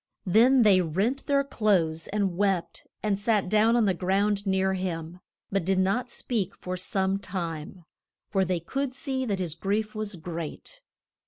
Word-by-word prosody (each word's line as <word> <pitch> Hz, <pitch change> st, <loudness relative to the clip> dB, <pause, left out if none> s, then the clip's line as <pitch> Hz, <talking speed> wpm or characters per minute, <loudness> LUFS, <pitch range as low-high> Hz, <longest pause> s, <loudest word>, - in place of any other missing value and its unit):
Then 235 Hz, +7 st, +5 dB
they 195 Hz, -4 st, +6 dB
rent 195 Hz, -, -1 dB
their 280 Hz, -1 st, +3 dB
clothes 180 Hz, -11 st, +1 dB
and 200 Hz, -3 st, -1 dB
wept, 195 Hz, -2 st, -1 dB, 0.2 s
and 205 Hz, -2 st, 0 dB
sat 210 Hz, -2 st, +1 dB
down 215 Hz, +3 st, +4 dB
on 235 Hz, -2 st, +4 dB
the 190 Hz, -, +3 dB
ground 200 Hz, +3 st, 0 dB
near 190 Hz, 0 st, +2 dB
him, 175 Hz, -2 st, -4 dB, 0.3 s
but 195 Hz, -2 st, +1 dB
did 190 Hz, +2 st, +1 dB
not 195 Hz, +7 st, +1 dB
speak 230 Hz, -5 st, -2 dB
for 185 Hz, 0 st, -5 dB
some 190 Hz, +1 st, -1 dB
time, 170 Hz, -2 st, -5 dB, 0.4 s
for 195 Hz, -2 st, +1 dB
they 180 Hz, -1 st, 0 dB
could 265 Hz, -, -3 dB
see 270 Hz, -3 st, -2 dB
that 205 Hz, -5 st, -1 dB
his 175 Hz, -4 st, -3 dB
grief 205 Hz, +5 st, -1 dB
was 215 Hz, -2 st, -4 dB
great. 170 Hz, -, -7 dB
195 Hz, 165 wpm, -27 LUFS, 180-215 Hz, 0.4 s, they